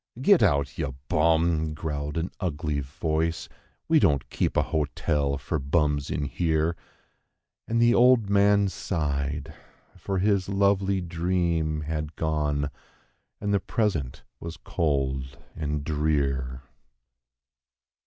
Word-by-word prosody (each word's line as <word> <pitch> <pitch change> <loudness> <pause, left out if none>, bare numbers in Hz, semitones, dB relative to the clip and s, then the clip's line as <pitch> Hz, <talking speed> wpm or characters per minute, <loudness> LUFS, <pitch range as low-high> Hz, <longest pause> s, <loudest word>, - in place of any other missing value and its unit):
"Get 180 +7 +5
out, 70 0 +2
ye 80 - 0 0.2
bum!" 80 0 +2
growled 75 -2 -4
an 85 +3 -2
ugly 75 -5 -2
voice: 80 +4 -2 0.4
"we - - +5
don't 70 -2 +2
keep - - -1
a - - +4
hotel 75 -2 -1
fer 70 +4 -3
bums 70 0 0
in 75 - -1
here." 80 +2 0 0.9
And 115 +1 +1
the 120 0 +5
old 125 -3 +5
man 100 0 +4
sighed, 75 -4 -2 0.4
for 95 +2 -3
his 100 0 +1
lovely 100 -1 +2
dream 85 -3 0
had 75 0 -4
gone, 75 -2 -1 0.7
and 100 0 -1
the 100 - +3
present 90 - -2 0.2
was 85 0 -7
cold 65 -4 -1 0.2
and 75 -2 -2
drear. 70 -4 -1
80 Hz, 115 wpm, -26 LUFS, 70-90 Hz, 0.9 s, Get